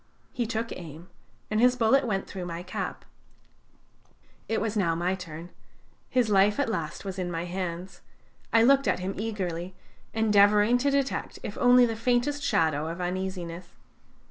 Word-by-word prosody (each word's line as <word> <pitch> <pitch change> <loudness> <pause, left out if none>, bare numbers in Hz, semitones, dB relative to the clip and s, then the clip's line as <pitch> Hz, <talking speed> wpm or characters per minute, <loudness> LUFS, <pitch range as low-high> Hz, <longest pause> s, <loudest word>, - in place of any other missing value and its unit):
He 240 -2 -1
took 230 0 -3
aim, 170 +1 -9 0.4
and 215 - +1
his 250 +2 +5
bullet 250 +3 +3
went 195 -3 -1
through 185 -3 -6
my 170 0 -5
cap. 180 - -5 1.4
It 225 - +1
was 220 0 -2
now 170 -6 +1
my 175 +2 0
turn. 175 -2 -8 0.6
His 250 -3 +2
life 205 +3 +3
at 285 - +1
last 170 -4 -4
was 190 -1 -5
in 180 -1 -2
my 170 0 -3
hands; 180 0 -5 0.5
I 225 0 +5
looked 275 +2 +4
at - - +2
him 185 +2 -3
eagerly, 185 -4 -4 0.4
endeavoring 210 +1 +4
to 280 +3 +2
detect 275 -1 -1
if 205 - -5
only 245 0 +6
the 225 -1 -2
faintest 245 +5 0
shadow 160 - +1
of 165 +2 -5
uneasiness. 180 -1 -4
195 Hz, 160 wpm, -27 LUFS, 175-230 Hz, 1.4 s, only